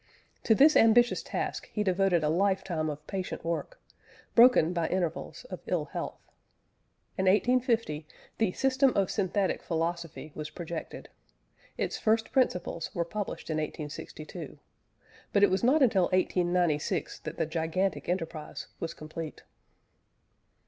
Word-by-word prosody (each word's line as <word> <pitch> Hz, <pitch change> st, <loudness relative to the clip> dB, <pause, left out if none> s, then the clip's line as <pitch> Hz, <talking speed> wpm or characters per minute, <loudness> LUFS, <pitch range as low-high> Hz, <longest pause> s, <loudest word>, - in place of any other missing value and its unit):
To 220 Hz, -, +5 dB
this 300 Hz, +6 st, +6 dB
ambitious 235 Hz, +2 st, +5 dB
task -, -, -4 dB
he 210 Hz, -, -1 dB
devoted 185 Hz, -3 st, +2 dB
a 150 Hz, -, +2 dB
lifetime 185 Hz, -2 st, +1 dB
of 150 Hz, 0 st, -6 dB
patient 190 Hz, -3 st, -5 dB
work, 170 Hz, -, -3 dB, 0.5 s
broken 230 Hz, -9 st, +6 dB
by 170 Hz, -2 st, 0 dB
intervals 180 Hz, -, -3 dB
of -, -, -5 dB
ill -, -, 0 dB
health. -, -, -5 dB, 1.0 s
In 190 Hz, -, +2 dB
1850 225 Hz, -, +2 dB, 0.3 s
the 220 Hz, -5 st, +2 dB
System 270 Hz, 0 st, +3 dB
of 195 Hz, -2 st, +2 dB
Synthetic 195 Hz, -1 st, 0 dB
Philosophy 165 Hz, -2 st, -3 dB
was 155 Hz, 0 st, -6 dB
projected; 170 Hz, -1 st, -7 dB, 0.7 s
its -, -, -2 dB
First 220 Hz, +1 st, +1 dB
Principles 180 Hz, -, 0 dB
were 170 Hz, -, 0 dB
published 205 Hz, -2 st, -5 dB
in 155 Hz, -, 0 dB
1862, 155 Hz, 0 st, -6 dB, 0.7 s
but 200 Hz, -, +3 dB
it 205 Hz, -, +6 dB
was 190 Hz, -, +1 dB
not 275 Hz, +5 st, +5 dB
until 195 Hz, -7 st, +4 dB
1896 175 Hz, -3 st, 0 dB
that -, -, -7 dB
the -, -, +1 dB
gigantic 165 Hz, +5 st, -1 dB
enterprise 165 Hz, -4 st, -4 dB
was 165 Hz, -, -4 dB
complete. 155 Hz, 0 st, -7 dB
180 Hz, 130 wpm, -29 LUFS, 160-215 Hz, 1.0 s, this